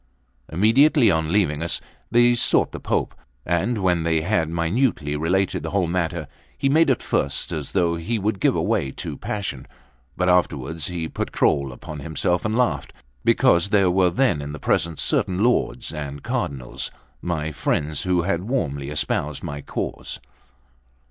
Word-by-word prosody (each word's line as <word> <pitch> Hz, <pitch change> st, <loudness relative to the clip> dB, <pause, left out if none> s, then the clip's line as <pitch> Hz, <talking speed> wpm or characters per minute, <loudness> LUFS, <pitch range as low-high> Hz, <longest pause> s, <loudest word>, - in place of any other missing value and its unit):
Immediately 115 Hz, -, +5 dB
on 80 Hz, -1 st, 0 dB
leaving 85 Hz, -7 st, +1 dB
us, 85 Hz, -, 0 dB, 0.3 s
they 120 Hz, +1 st, +5 dB
sought 120 Hz, -, +2 dB
the -, -, -6 dB
Pope; -, -, -1 dB, 0.3 s
and 95 Hz, +6 st, 0 dB
when 90 Hz, -2 st, +2 dB
they 80 Hz, -1 st, +1 dB
had 85 Hz, -2 st, +1 dB
minutely 85 Hz, -, 0 dB
related 90 Hz, +5 st, 0 dB
the -, -, -4 dB
whole 100 Hz, -2 st, +1 dB
matter, 85 Hz, -2 st, -2 dB, 0.3 s
he 135 Hz, 0 st, +1 dB
made 160 Hz, +2 st, +4 dB
at 130 Hz, -, +1 dB
first 70 Hz, -, -1 dB
as 75 Hz, -5 st, -4 dB
though 85 Hz, -3 st, +2 dB
he 110 Hz, +8 st, -2 dB
would 105 Hz, -1 st, -1 dB
give -, -, +3 dB
way 70 Hz, -, 0 dB
to -, -, -5 dB
passion, 95 Hz, -11 st, -4 dB, 0.5 s
but 90 Hz, -, +1 dB
afterwards 80 Hz, -4 st, +1 dB
he 85 Hz, -3 st, -3 dB
put -, -, -4 dB
control 70 Hz, -1 st, +2 dB
upon 75 Hz, +5 st, -8 dB
himself 80 Hz, +5 st, -1 dB
and 110 Hz, +1 st, 0 dB
laughed, 125 Hz, -1 st, 0 dB, 0.3 s
because 85 Hz, +3 st, +4 dB
there 100 Hz, -4 st, +4 dB
were 90 Hz, 0 st, +4 dB
then 90 Hz, -, +1 dB
in 70 Hz, +1 st, -6 dB
the 75 Hz, -, -7 dB
presence 85 Hz, +2 st, 0 dB
certain 105 Hz, -, +1 dB
lords 120 Hz, -3 st, +1 dB
and 70 Hz, -2 st, -6 dB
cardinals, 65 Hz, -4 st, -3 dB, 0.3 s
my 80 Hz, -3 st, -2 dB
friends, 75 Hz, +1 st, -1 dB
who 90 Hz, -2 st, +1 dB
had 95 Hz, +2 st, -1 dB
warmly 70 Hz, -, -1 dB
espoused 75 Hz, 0 st, -2 dB
my 70 Hz, 0 st, -5 dB
cause. -, -, -5 dB
85 Hz, 160 wpm, -23 LUFS, 75-105 Hz, 0.5 s, Immediately